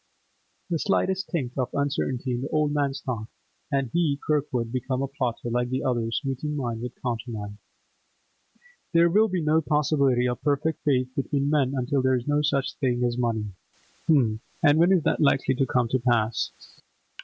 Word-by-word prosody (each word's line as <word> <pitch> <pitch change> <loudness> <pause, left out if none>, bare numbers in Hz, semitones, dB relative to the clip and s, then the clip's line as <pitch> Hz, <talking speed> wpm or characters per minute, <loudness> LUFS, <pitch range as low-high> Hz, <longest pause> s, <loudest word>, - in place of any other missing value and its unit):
The 165 - +1
slightest 190 0 0
tinct 135 -6 -3
of 125 - 0
uncertainty 140 -2 -1
in 120 0 -2
the 140 - -4
old 150 -1 +1
man's 140 -1 -1
thought, 115 -6 -4 0.4
and 135 -4 0
he, 160 -5 +2
Kirkwood, 135 -6 0
became 130 +1 -2
a - - -1
plotter, 125 -4 -3
like 120 +1 0
the 130 +1 -2
others, 120 0 -1
meeting 135 +3 -2
mine 120 -4 -3
with 125 0 -7
countermine. 115 -4 -4 1.3
'There 170 0 +5
will 215 +4 +5
be 185 -5 -2
no 155 +1 +3
possibility 140 -5 +2
of 125 -1 -3
perfect 150 +2 0
faith 130 -3 +2
between 140 +1 0
men 140 -3 +2
until 135 +2 0
there 130 0 +3
is 125 +1 -3
no 145 0 +2
such 140 -2 0
thing 125 -3 0
as 120 -1 +1
money! 115 -4 -1 0.6
H'm, 125 -9 +3 0.2
and 145 0 +5
when 175 +3 +5
is 180 -5 +4
that - - +1
likely 135 -2 +3
to 135 +1 0
come 125 -1 +1
to 130 - +1
pass? 115 -2 +1
135 Hz, 180 wpm, -26 LUFS, 120-150 Hz, 1.3 s, There